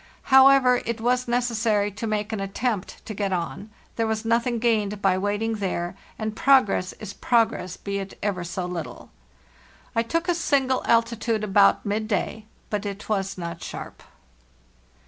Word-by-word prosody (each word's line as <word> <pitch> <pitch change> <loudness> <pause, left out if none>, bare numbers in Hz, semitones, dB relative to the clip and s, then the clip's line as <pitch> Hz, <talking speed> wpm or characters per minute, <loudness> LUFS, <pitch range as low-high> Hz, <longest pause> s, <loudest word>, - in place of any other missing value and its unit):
However, 265 -2 +7
it 235 0 -3
was 250 +2 +1
necessary 230 -4 +1
to 210 +3 -5
make 215 0 -2
an 215 - -2
attempt 195 +1 -3
to 220 - -5
get 200 -1 -2
on; 185 +4 -3 0.3
there 225 -1 +1
was 220 0 -2
nothing 235 +1 +1
gained 215 -3 +1
by 195 -2 +3
waiting 205 +3 -1
there, 180 -3 -2 0.2
and 220 -1 -3
progress 240 -9 +3
is 205 -2 -8
prog 230 -2 +2
ress 180 -4 -6
be 200 0 -3
it 195 0 -7
ever 195 -4 -1
so 175 +1 -4
little. 180 -2 -6 0.4
" - - -28
T 230 - +3
took 330 +8 -1
a 350 - +3
single 275 -6 +1
altitude 230 -1 +1
about 200 -1 +4
midday, 215 +1 -2 0.3
but 210 -1 -1
it 200 0 -6
was 195 -2 -1
not 170 -2 -6
sharp. - - -8
215 Hz, 165 wpm, -24 LUFS, 195-235 Hz, 0.4 s, However